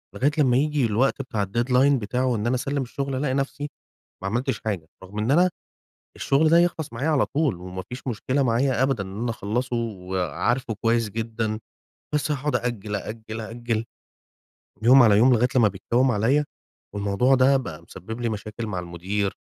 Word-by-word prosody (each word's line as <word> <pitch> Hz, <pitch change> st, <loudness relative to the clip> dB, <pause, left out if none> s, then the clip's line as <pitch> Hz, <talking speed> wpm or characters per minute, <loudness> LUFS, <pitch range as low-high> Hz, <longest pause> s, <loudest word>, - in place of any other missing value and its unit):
لغاية 140 Hz, +3 st, +2 dB
لما 130 Hz, -5 st, +4 dB
ييجي 150 Hz, -1 st, +1 dB
الوقت 115 Hz, +6 st, +1 dB
بتاع 110 Hz, -6 st, -2 dB
الdeadline 125 Hz, +7 st, +3 dB
بتاعه 125 Hz, +4 st, -1 dB
وإن 120 Hz, -3 st, 0 dB
أنا 125 Hz, -, +2 dB
أسلّم 140 Hz, +2 st, -1 dB
الشغل 135 Hz, +2 st, -4 dB
ألاقي 130 Hz, 0 st, 0 dB
نفسي 140 Hz, +2 st, -2 dB, 0.5 s
ما -, -, -1 dB
عملتش 120 Hz, +1 st, -1 dB
حاجة. 95 Hz, -7 st, -2 dB, 0.2 s
رغم 100 Hz, +3 st, -7 dB
إن 110 Hz, +5 st, 0 dB
أنا 175 Hz, +5 st, +5 dB, 0.7 s
الشغل 145 Hz, +4 st, +2 dB
ده 165 Hz, -, +6 dB
يخلَص 170 Hz, -5 st, +1 dB
معايا 130 Hz, +7 st, -2 dB
على 145 Hz, -3 st, +3 dB
طول 145 Hz, -, 0 dB
وما 90 Hz, +1 st, -7 dB
فيش 125 Hz, +3 st, -8 dB
مشكلة 130 Hz, +4 st, 0 dB
معايا 125 Hz, +1 st, +2 dB
أبدًا 135 Hz, -6 st, +1 dB
إن 95 Hz, +3 st, -7 dB
أنا 120 Hz, 0 st, -1 dB
أخلّصه 120 Hz, +3 st, -2 dB
وعارفه 105 Hz, -, -2 dB
كويس 115 Hz, -1 st, +2 dB
جدًا. 110 Hz, 0 st, -3 dB, 0.5 s
بس 150 Hz, 0 st, 0 dB
هاقعُد 145 Hz, -1 st, 0 dB
آجَل، 110 Hz, -4 st, -3 dB
آجَل، 110 Hz, +2 st, -6 dB
آجَل، 115 Hz, 0 st, -3 dB, 1.0 s
يوم 130 Hz, +2 st, +8 dB
على 105 Hz, -3 st, +6 dB
يوم، 125 Hz, +4 st, +6 dB
لغاية 120 Hz, +2 st, +3 dB
لما 120 Hz, -4 st, +6 dB
بيتكوّم 120 Hz, +7 st, +1 dB
عليَّ. 125 Hz, +8 st, +2 dB, 0.5 s
والموضوع 100 Hz, +6 st, +2 dB
ده 130 Hz, +2 st, +5 dB
بقى 85 Hz, -, -6 dB
مسبِّب 110 Hz, +7 st, -8 dB
لي 120 Hz, -, 0 dB
مشاكل 110 Hz, +1 st, -5 dB
مع 95 Hz, -4 st, -3 dB
المدير 95 Hz, +4 st, -2 dB
120 Hz, 175 wpm, -24 LUFS, 105-135 Hz, 1.0 s, يوم